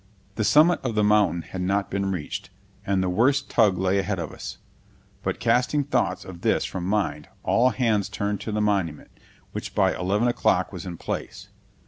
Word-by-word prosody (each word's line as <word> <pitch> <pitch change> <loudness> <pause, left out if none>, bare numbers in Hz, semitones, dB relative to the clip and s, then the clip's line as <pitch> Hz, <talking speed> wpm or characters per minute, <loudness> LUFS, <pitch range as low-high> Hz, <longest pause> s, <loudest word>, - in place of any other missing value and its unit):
The 110 - -1
summit 155 +9 +5
of 120 -4 -2
the 105 - +3
mountain 105 -5 +3
had 95 - -6
not 100 +2 0
been 100 0 -1
reached, 85 -6 -5 0.4
and 95 -1 +2
the - - 0
worst 135 +9 +2
tug 105 -5 +4
lay 95 +1 +1
ahead 95 +1 -1
of 85 -4 -4
us. - - -8 0.6
But - - -2
casting 125 +5 +2
thoughts 130 -3 -1
of 90 -2 -10
this - - +1
from 90 -2 -4
mind, 100 -6 -1
all 125 +2 +3
hands 110 -6 +1
turned 100 -1 -2
to 110 - -4
the 105 0 0
monument, 95 -8 -1 0.4
which - - -6
by - - +3
eleven 100 +6 +1
o'clock 120 - +1
was - - -7
in 85 -2 -6
place. - - -5
100 Hz, 185 wpm, -25 LUFS, 95-115 Hz, 0.6 s, summit